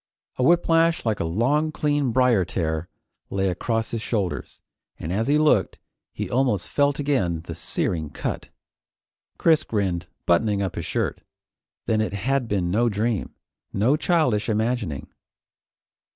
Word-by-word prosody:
A - - -1
whiplash 165 0 +3
like 110 -2 0
a - - 0
long 135 - +1
clean 145 -4 0
briar 125 -5 +4
tear 85 -1 -2 0.4
lay 95 0 0
across 115 +5 -2
his 115 - -2
shoulders, 105 -6 -3 0.4
and 80 +3 -4
as 110 +4 0
he 145 +1 +4
looked, 155 0 +3 0.3
he - - -4
almost 120 -7 0
felt 145 0 +2
again 125 - 0
the 85 0 -7
searing 80 -1 -2
cut. - - -4 0.9
Chris 160 -2 +4
grinned, 90 -5 -1 0.2
buttoning 100 +4 +2
up 95 -3 -1
his - - -5
shirt. - - -2 0.6
Then 110 -1 +1
it 110 - -2
had 125 +5 0
been 95 -5 0
no 120 +5 +3
dream, 110 +1 -1 0.4
no 115 +8 +3
childish 150 - +1
imagining. 110 - -1
110 Hz, 140 wpm, -24 LUFS, 95-135 Hz, 0.9 s, briar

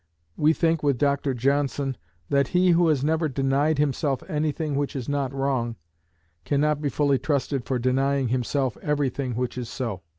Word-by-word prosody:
We 150 +1 +4
think 165 -1 +1
with 140 -3 +1
Dr 140 0 +1
Johnson, 140 +1 0 0.3
that 140 -1 +2
he 180 0 +5
who 170 0 +4
has 150 -4 +2
never 160 +1 +1
denied 140 +3 +1
himself 140 -1 0
anything 150 0 -1
which 140 0 -1
is 130 -3 -4
not 140 -2 -1
wrong, 135 -4 -1 0.7
cannot 150 - +1
be 145 - 0
fully 140 -2 +2
trusted 140 -2 -1
for 130 - -1
denying 135 +1 +1
himself 130 0 -1
everything 140 -4 -1
which 125 +1 -2
is 120 -2 -5
so. 115 -9 -4
140 Hz, 165 wpm, -25 LUFS, 130-150 Hz, 0.7 s, he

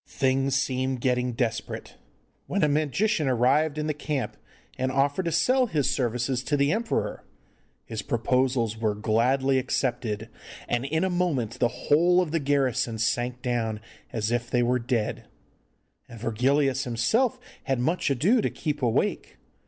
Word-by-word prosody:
Things 135 0 +1
seemed 130 -1 0
getting 125 0 0
desperate, 115 -1 -3 0.5
when 200 0 0
a - - +5
magician 155 - +1
arrived 140 +5 +2
in 150 - -1
the 155 - 0
camp 150 -2 -3 0.4
and 130 0 -1
offered 140 +7 +1
to 170 - 0
sell 255 - +3
his 150 - 0
services 125 0 0
to 145 - +1
the 140 +1 +2
emperor. 225 +1 -1 0.6
His 110 -1 -5
proposals 120 -1 0
were 110 -2 -1
gladly 130 +5 +2
accepted, 120 -4 -2 0.4
and 120 +2 -1
in 160 +5 0
a 190 - +1
moment 135 -10 -1
the 120 - +4
whole 170 +8 +3
of 175 -4 0
the 165 - +1
garrison 135 -5 0
sank 120 +2 -1
down 115 -4 -1 0.3
as 110 0 -2
if 120 0 -1
they 120 -1 +2
were 125 +1 +2
dead, 115 -1 -2 0.8
and 115 - -10
Virgilius 130 +4 +1
himself 220 - +1 0.3
had 135 -4 0
much 160 +8 0
ado 180 - +3
to - - 0
keep 150 -2 -4
awake. 120 -3 0
130 Hz, 150 wpm, -26 LUFS, 120-150 Hz, 0.8 s, a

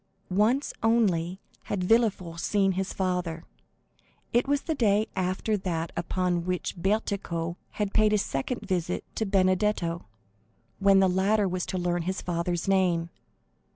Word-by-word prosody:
Once 230 +9 +2
only 190 -6 +2 0.3
had 195 -3 -2
Villefort 185 -5 +1
seen 195 +1 +2
his 190 +1 -2
father; 180 -3 -2 0.9
it 240 +2 +3
was 285 0 +1
the 320 - -1
day 215 -6 +2
after 190 +3 0
that 170 -4 -2
upon 175 0 -1
which 180 0 -2
Bertuccio 180 -3 -1
had 205 -2 -3
paid 215 -1 +4
his 210 -1 +2
second 135 - -3
visit 180 -2 -1
to 220 - -1
Benedetto, 185 - +1 0.7
when 195 -1 +5
the 190 - +5
latter 195 +3 +2
was 180 -1 -2
to 185 - -2
learn 175 -1 0
his 185 +3 -2
father's 175 0 -2
name. 180 -3 +2
185 Hz, 140 wpm, -27 LUFS, 175-210 Hz, 0.9 s, when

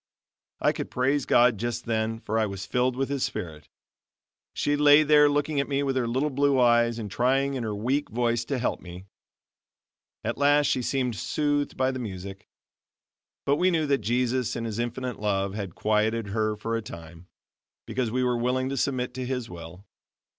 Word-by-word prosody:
I - - +3
could - - -5
praise 135 +2 0
God 120 -3 +4
just 120 +1 -3
then, 115 -1 -1
for 110 +2 -1
I 110 - +1
was 100 0 -6
filled 125 +5 0
with 135 +1 -1
His 140 -2 -2
Spirit. 80 -8 -5 0.9
She 145 - +1
lay 145 +1 +6
there 150 -1 +6
looking 145 0 0
at 140 - -1
me 140 0 0
with 135 -1 -1
her 125 -2 0
little 130 +6 0
blue 140 0 +2
eyes 120 -1 +4
and 105 -4 -6
trying 135 +5 +1
in 130 - -3
her 110 -2 -3
weak 130 +8 -1
voice 120 0 0
to 140 - -2
help 125 - -2
me. 90 +1 -10 1.2
At 115 +4 -3
last 145 +1 +4
she 130 - +1
seemed 125 -1 -1
soothed 145 - -1
by 130 0 +2
the 130 - -5
music. 95 -4 -7 1.0
But 140 +1 +2
we 185 +3 +3
knew 165 -3 +1
that 140 -1 +2
Jesus 125 +2 0
in 115 - -3
his 110 0 -4
infinite 125 +1 -3
love, 100 -2 -1
had 100 -4 -5
quieted 110 0 0
her 110 +1 0
for 115 +2 -3
a 115 - -1
time, 85 -3 -11 0.6
because 120 +1 -2
we 125 +3 0
were 125 -1 +1
willing 130 +2 0
to 135 - -3
submit 125 -2 -1
to 130 0 -4
His 125 -4 -3
will. 85 +3 -10
120 Hz, 190 wpm, -26 LUFS, 110-135 Hz, 1.2 s, lay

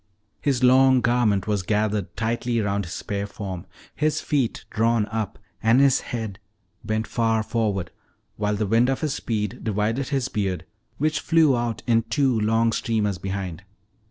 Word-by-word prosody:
His 135 -3 0
long 130 0 +6
garment 120 -6 +2
was 105 -2 0
gathered 105 0 -1
tightly 115 +2 0
round 100 -2 0
his 85 - -7
spare 100 0 -3
form, 95 -3 -6 0.3
his 155 0 0
feet 135 -6 -1
drawn 115 -1 +2
up 110 -3 -3 0.2
and 115 +3 +4
his 140 -2 +4
head 110 -4 -5 0.4
bent 110 +1 -1
far 115 -1 +1
forward, 105 -6 -1 0.4
while 105 0 0
the 105 +1 -1
wind 115 +5 +3
of 135 - -1
his 155 -3 0
speed 105 -3 -3
divided 110 +5 0
his 135 -3 0
beard, 100 -6 -2 0.3
which 155 +1 +1
flew 155 -4 +4
out 120 -2 -2
in 115 -1 +3
two 130 -1 +1
long 115 +2 +2
streamers 105 -5 -1
behind. 95 -3 -4
110 Hz, 155 wpm, -24 LUFS, 105-125 Hz, 0.4 s, long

